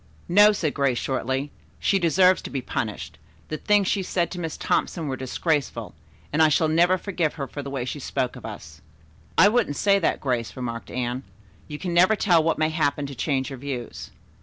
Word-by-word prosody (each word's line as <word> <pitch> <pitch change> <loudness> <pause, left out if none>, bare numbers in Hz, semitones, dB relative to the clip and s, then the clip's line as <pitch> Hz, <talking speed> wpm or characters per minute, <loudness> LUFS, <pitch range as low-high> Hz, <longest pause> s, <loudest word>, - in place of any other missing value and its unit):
"No," 205 +4 +7
said 165 -8 -1
Grace 135 -3 +1
shortly. 130 +2 -2 0.3
"She 195 - +1
deserves 180 +2 +4
to - - -7
be 135 - -3
punished. 105 - -4 0.3
The 155 - -3
things 205 +2 +2
she 200 - +1
said 175 -2 -1
to 180 - -5
Miss 165 -2 -4
Thompson 165 -4 -1
were 135 - -2
disgraceful, 140 +3 -2 0.4
and 155 - +3
I 155 - +6
shall 155 +2 +3
never 175 +4 +4
forgive 175 -5 -2
her 140 - -3
for 145 - -7
the 140 - -7
way 135 -3 -3
she 135 +3 -5
spoke 130 -1 -2
of - - -11
us." 75 0 -9 0.6
"I 190 - +8
wouldn't 210 -9 +1
say 200 +4 +3
that, 170 - 0
Grace," 125 -4 -2
remarked 115 -3 -5
Anne. 125 0 -3 0.5
"You 150 - -6
can 175 +2 -4
never 185 +5 +5
tell 175 -5 +3
what 165 - +1
may 155 0 +2
happen 145 -2 0
to 140 - -7
change 135 +1 -1
your 135 - -7
views." 130 -3 -6
150 Hz, 205 wpm, -24 LUFS, 130-175 Hz, 0.6 s, I